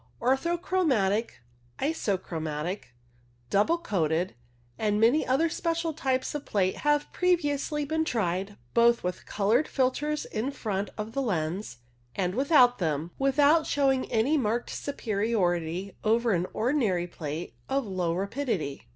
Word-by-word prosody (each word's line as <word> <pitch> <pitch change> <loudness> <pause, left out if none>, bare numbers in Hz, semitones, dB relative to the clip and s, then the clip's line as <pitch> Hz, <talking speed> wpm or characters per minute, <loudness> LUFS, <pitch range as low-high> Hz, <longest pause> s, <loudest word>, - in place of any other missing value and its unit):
Orthochromatic, 265 - +1 0.3
isochromatic, 180 - -2 0.7
double 210 +13 +3
coated, 180 - 0 0.5
and 210 -1 +1
many 240 +8 +4
other 270 +6 +3
special 330 0 -1
types 260 -4 -1
of 295 -1 -4
plate 190 -2 0
had 295 0 +2
previously 300 -4 +1
been 320 +2 0
tried, 195 - -1 0.2
both 235 0 +4
with 180 0 -4
coloured 220 +8 +2
filters 290 +3 0
in 225 +5 -2
front 205 -7 -3
of 215 +1 -4
the 275 - 0
lens 175 - -2 0.4
and 180 -2 0
without 255 - +4
them, 160 -1 -1
without 285 +4 +4
showing 270 -2 +1
any 255 +7 +2
marked 235 0 -1
superiority 195 - -1
over 230 +2 +2
an 180 -1 +1
ordinary 220 -8 +1
plate 160 -1 -6 0.2
of 270 -1 0
low 185 -4 -1
rapidity. 195 - -2
230 Hz, 125 wpm, -28 LUFS, 185-285 Hz, 0.7 s, many